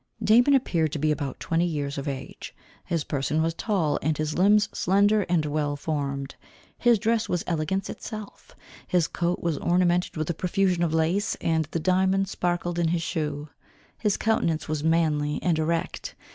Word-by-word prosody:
Damon 245 +6 +5
appeared 165 - +1
to - - -1
be 155 +1 +1
about 145 -3 -3
twenty 165 +1 0
years 145 -3 -3
of 140 - -6
age. 135 -2 -6 0.3
His 165 -3 -1
person 145 +2 -1
was 165 +1 +1
tall, 170 -6 0
and 155 +1 0
his 155 0 -2
limbs 205 +3 +4
slender 205 +2 +2
and 170 -3 +2
well 145 -1 -1
formed. 140 -2 -3 0.5
His 240 -2 +4
dress 225 +2 0
was 175 - 0
elegance 175 +3 -1
itself. 215 -2 -9 0.3
His 175 -3 +2
coat 175 +1 -2
was 165 -4 0
ornamented 175 -1 +1
with 155 -1 -2
a - - -3
profusion 180 +1 0
of 170 -2 +1
lace, 170 +7 +1
and 160 -1 0
the 160 +3 -4
diamond 190 +3 +2
sparkled 175 -1 -1
in 170 - +2
his 165 0 0
shoe. 150 -2 -3 0.5
His 210 -3 +1
countenance 170 -8 0
was 155 -1 -2
manly 155 -3 +1
and 170 -3 +1
erect. 165 +1 -2
165 Hz, 175 wpm, -26 LUFS, 155-185 Hz, 0.5 s, Damon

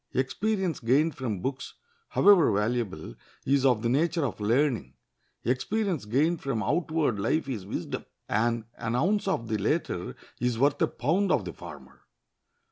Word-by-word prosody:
Experience 190 +6 0
gained 140 +7 +2
from 110 -8 -4
books, 135 +4 -4 0.3
however 195 -5 +5
valuable, 105 - -1 0.3
is 135 0 +2
of 125 -5 +3
the - - +2
nature 160 +5 +1
of 120 - -4
learning; 120 +5 +1 0.5
experience 165 - 0
gained 150 +10 +1
from 120 -6 -2
outward 155 - 0
life 140 +9 0
is 110 -8 -5
wisdom; - - -4 0.2
and 115 +1 0
an 115 +1 -2
ounce 195 +11 +1
of 115 -12 -1
the 110 -1 -1
latter 100 - -1 0.2
is 125 -1 0
worth 140 +4 +2
a - - +4
pound 180 +9 0
of 110 -9 +2
the 85 - -5
former. - - -12
130 Hz, 150 wpm, -27 LUFS, 115-160 Hz, 0.5 s, however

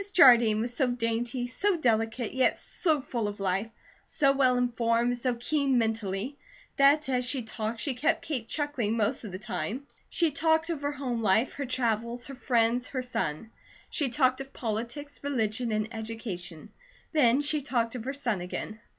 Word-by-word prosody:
Jardine 235 -8 +7
was 240 +1 -2
so 260 - +2
dainty, 240 +1 -1
so 375 +10 0
delicate, 225 -3 0
yet 260 0 +3
so 315 -5 0
full 235 -4 -2
of 205 0 -6
life, 195 +3 -1 0.4
so 275 -4 +3
well 260 -2 +3
informed, 240 0 +1
so 250 0 0
keen 275 +2 +1
mentally, 225 +3 -1 0.4
that 285 +1 +5
as 250 -2 +1
she 250 0 0
talked 220 +1 -4
she 280 - 0
kept 310 +6 0
Kate 255 -7 -3
chuckling 265 -8 -1
most 225 +4 0
of 210 - -7
the 185 - -5
time. 220 +5 -4 0.2
She 335 -3 +2
talked 320 +3 +2
of 310 -4 -4
her 285 0 -1
home 255 -4 -3
life, 220 +4 +2
her 280 -2 -4
travels, 235 -1 -1
her 275 - -7
friends, 240 -1 +1
her 255 -2 -3
son. 220 -4 -3 0.4
She 285 -5 +1
talked 255 0 +2
of 270 0 -9
politics, 240 +7 -5
religion, 235 -4 -1
and 215 0 0
education; 220 -5 -6 0.4
then 265 -5 +4
she 295 +1 +2
talked 240 -4 -1
of 245 -2 -6
her 270 - -2
son 240 -9 -1
again. 200 +4 -5
245 Hz, 175 wpm, -28 LUFS, 225-275 Hz, 0.4 s, Jardine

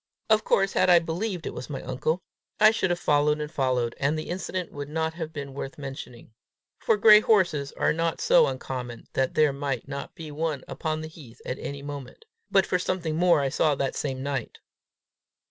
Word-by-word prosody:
Of 215 0 +5
course 195 0 +2
had 185 - +3
I 175 - +8
believed 170 +2 -2
it - - -4
was - - -7
my 140 - -5
uncle, 150 +7 -2 0.4
I 215 +1 +8
should 190 -4 0
have 175 - +1
followed 150 0 +2
and 150 0 -4
followed; 130 -5 0
and 145 +3 +1
the 155 - -5
incident 185 0 -4
would 145 0 -6
not 160 +1 -1
have 160 -2 -5
been 140 -3 -6
worth 135 0 -6
mentioning, 135 -5 -9 0.5
for 450 -3 +2
gray 210 - +8
horses 175 -11 +2
are - - +1
not 165 +1 -1
so - - +5
uncommon 125 - -5
that 130 -1 0
there 150 -2 +4
might 140 -3 -3
not 140 0 -6
be 160 -2 -8
one 150 -2 -2
upon 155 0 -3
the 155 - -5
heath 140 -7 -14
at 125 - -4
any 140 0 -6
moment, 145 - -8 0.2
but 195 -1 +4
for 180 - 0
something 175 -3 -2
more 175 -2 +4
I 135 - 0
saw 150 +2 +2
the 135 -1 -1
same 135 -2 -3
night. 135 -4 -3
150 Hz, 200 wpm, -26 LUFS, 140-175 Hz, 0.5 s, I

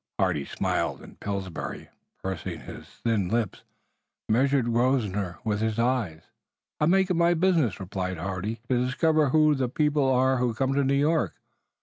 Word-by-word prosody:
Hardy 70 -2 +1
smiled, - - -2
and - - -14
Pillsbury, 95 -3 -5 0.3
pursing 95 -3 -4
his - - -10
thin 110 -5 -1
lips, 115 -4 -1 0.7
measured 135 +3 +2
Grosvenor 105 -8 0
with 105 -2 0
his 110 -1 0
eyes. 115 -10 0 0.6
"I 150 - +3
make 190 +2 +3
it - - +4
my 170 0 +3
business," 165 - +2
replied 95 -1 -4
Hardy, 95 +5 -3
"to 125 -1 +2
discover 155 +3 +2
who 155 +1 +4
the 130 -3 -1
people 145 0 +2
are 130 +1 +3
who 120 -2 0
come 135 +3 0
to 140 +1 +2
New 135 +1 +2
York. 150 +3 +1
125 Hz, 155 wpm, -26 LUFS, 100-145 Hz, 0.7 s, it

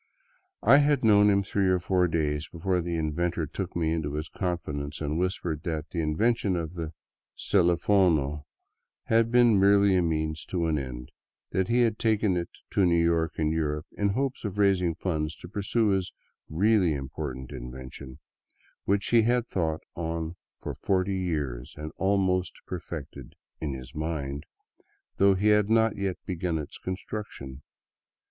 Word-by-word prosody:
I 140 - +7
had 145 -2 +3
known 105 -2 +6
him 100 -1 +3
three 95 0 0
or 95 0 +4
four 90 0 +2
days 75 -2 -1
before 90 +2 -1
the 85 0 -3
inventor 80 +2 -1
took 95 +3 -5
me 80 -2 +1
into 75 -3 -2
his 75 +1 -4
confidence 75 -6 -3
and 75 +1 -2
whispered 90 -4 -2
that 80 -3 -4
the 85 - -1
invention 100 +5 +1
of 85 -1 -3
the 80 -3 -5 0.2
" - - -66
celifono 85 -5 +2 0.3
" - - -58
had 115 0 +4
been 120 -4 +5
merely 100 0 +5
a 90 - +4
means 80 -2 -1
to 85 -2 -1
an 80 -2 +1
end; 60 -2 -7 0.4
that 95 -1 0
he 120 +1 +3
had 115 -3 +1
taken 110 -4 +2
it 85 -1 -2 0.2
to 100 - +2
New 85 -2 +4
York 85 -1 +1
and 80 0 +1
Europe 75 -1 -1
in 100 - +1
the 100 - 0
hope 135 +2 0
of 100 -2 -4
raising 95 -4 +3
funds 80 -4 -2
to 85 - -11
pursue 105 +3 0
his 95 -2 0 0.2
" - - -66
really 95 -1 +3
im 70 -1 -4
portant 65 -3 -6
invention," 65 +1 -8 0.7
which 100 +1 +1
he 120 -1 +6
had 120 +1 +2
thought 80 -7 -1
on 80 0 -3 0.2
for - - -5
forty 95 0 0
years 75 -9 -3
and 75 +1 -6
al 100 +1 +2
ready 95 -1 +1 0.2
perfected 85 -5 -7
" - - -58
in 75 -4 -2
his 65 -1 -10
mind," 75 -2 -4 0.7
though 100 0 +5
he 105 +3 +2
had 105 -1 +4
not 115 -1 +3
yet 95 -2 -2
begun 90 -3 -2
its 75 -2 -7
con 95 - -3
struction. 70 -12 -7
85 Hz, 175 wpm, -27 LUFS, 75-100 Hz, 0.7 s, I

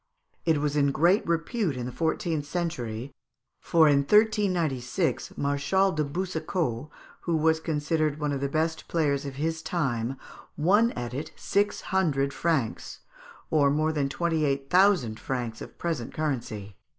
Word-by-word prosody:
It 160 -2 +4
was 145 0 -1
in 140 -1 +3
great 175 +9 +3
repute 170 - 0
in 125 - -3
the 125 - -4
fourteenth 160 0 -1
century, 130 -8 -3 0.5
for 160 -2 +4
in 145 -1 +5
1396 180 - +1
Marshal 145 +8 +1
de 155 -2 0
Boucicault, 155 - -2 0.3
who 170 -2 0
was 160 +1 +3
considered 155 -1 -1
one 150 -1 -1
of 140 -1 -2
the 140 - -1
best 160 +2 -1
players 145 -4 0
of 135 - -6
his 160 +3 -2
time, 135 -7 -1 0.4
won 205 +10 +4
at 120 0 -5
it 140 +4 -5
six 205 +1 0
hundred 140 -8 0
francs 155 -9 -1 0.5
(or 145 -3 +4
more 155 +2 +1
than 145 -3 0
twenty 165 +1 0
eight 140 -1 -1
thousand 180 - +4
francs 120 -4 -4
of - - -10
present 160 -9 -3
currency). 115 -10 -3
150 Hz, 150 wpm, -27 LUFS, 135-170 Hz, 0.5 s, in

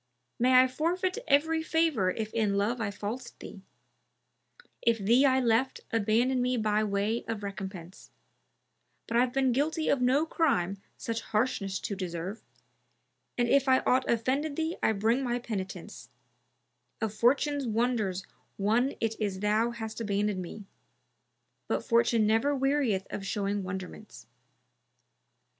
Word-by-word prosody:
May 255 +1 +6
I 260 - +6
forfeit 360 - -1
every 320 +3 +3
favour 320 - +1
if 215 +3 -4
in 210 -3 +1
love 230 +4 0
I 210 - -1
falsed 215 +5 -6
thee, 195 - -10 0.6
* - - -49 0.3
If 235 -1 +3
thee 235 +7 +4
I 260 0 +3
left, 245 +1 +1
abandon 230 +4 +2
me 250 0 +1
by 215 -1 +1
way 210 +3 -1
of 225 -2 -4
recompense: 190 -2 -7 1.0
But 230 - -1
I've 245 +1 +3
been 265 0 +2
guilty 310 +5 0
of 275 - +2
no 265 +5 +3
crime 200 - 0 0.2
such 230 0 -3
harshness 210 -4 -1
to 200 - -3
deserve, 185 +2 -5 0.5
* - - -48
And 240 -1 +2
if 275 +2 +3
I 260 0 +5
aught 255 +1 +1
offended 270 +6 0
thee 325 +2 -1
I - - +3
bring 225 +6 +1
my 240 -1 0
penitence; 210 -6 -6 0.9
Of 220 -2 -2
Fortune's 275 +4 +2
wonders 220 -5 0 0.3
one 230 +7 +1
it 225 -1 -1
is 200 -3 -1
thou 215 +3 +2
hast 225 -1 -6
abandoned 205 -2 -1
me, 195 +4 -8 0.5
* - - -49
But - - -1
Fortune 235 -2 +3
never 225 +7 +2
wearieth 265 -8 +1
of 195 - -4
showing 200 +1 -1
wonderments." 185 - -8
230 Hz, 145 wpm, -29 LUFS, 205-260 Hz, 1.0 s, May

